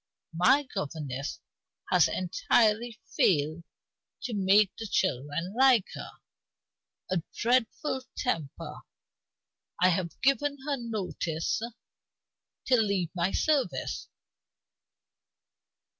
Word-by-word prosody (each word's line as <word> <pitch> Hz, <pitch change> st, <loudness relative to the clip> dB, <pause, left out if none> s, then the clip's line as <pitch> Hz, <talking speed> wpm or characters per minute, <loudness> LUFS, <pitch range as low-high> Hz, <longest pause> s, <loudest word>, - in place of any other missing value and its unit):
My 260 Hz, -, +4 dB
governess 145 Hz, -, -4 dB, 0.5 s
has -, -, +6 dB
entirely 215 Hz, +5 st, +1 dB, 0.2 s
failed 155 Hz, 0 st, +2 dB, 0.6 s
to 245 Hz, -, -3 dB
make 200 Hz, 0 st, +4 dB
the 225 Hz, -, -6 dB
children 165 Hz, 0 st, -1 dB
like 255 Hz, -5 st, +5 dB
her. -, -, -7 dB, 1.0 s
A 185 Hz, -2 st, +1 dB
dreadful 255 Hz, +3 st, +1 dB, 0.2 s
temper; 165 Hz, -, -3 dB, 1.0 s
I 185 Hz, -, +5 dB
have 170 Hz, -1 st, -1 dB
given 280 Hz, +2 st, +2 dB
her 290 Hz, -2 st, 0 dB
notice 195 Hz, -8 st, -2 dB, 1.0 s
to 255 Hz, -, +4 dB
leave 195 Hz, -6 st, 0 dB
my 180 Hz, +1 st, 0 dB
service. 300 Hz, -4 st, 0 dB
195 Hz, 85 wpm, -29 LUFS, 170-245 Hz, 1.0 s, has